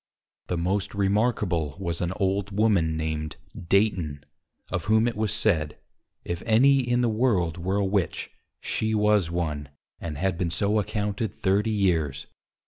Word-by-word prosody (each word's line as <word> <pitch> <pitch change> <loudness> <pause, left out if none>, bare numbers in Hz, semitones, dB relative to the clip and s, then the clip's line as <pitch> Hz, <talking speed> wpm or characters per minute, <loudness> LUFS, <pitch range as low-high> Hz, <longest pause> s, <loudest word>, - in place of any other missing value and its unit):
The 90 - -1
most 95 +4 -1
remarkable 100 - +1
was 85 -3 -3
an 90 0 -1
Old 100 0 0
Woman 100 -6 +2
named 80 -1 -3 0.3
Dayton, 90 -8 +1 0.5
of 90 -2 -2
whom 110 +2 +3
it 120 - -2
was 105 -1 -1
said, 80 -8 0 0.5
_If 85 0 -3
any 135 +5 +5
in 120 -1 +1
the 120 - +2
World 105 -8 +1
were 95 +3 -1
a 100 - +1
Witch, 95 -3 -1 0.3
she 110 0 -1
was 105 -4 +3
one, 75 -5 -3 0.3
and 80 -3 -5
had 95 +1 -1
been 90 - 0
so 100 +6 +1
accounted 105 +1 -2
30 100 +3 +1
years. 85 -10 0
95 Hz, 150 wpm, -26 LUFS, 85-105 Hz, 0.5 s, any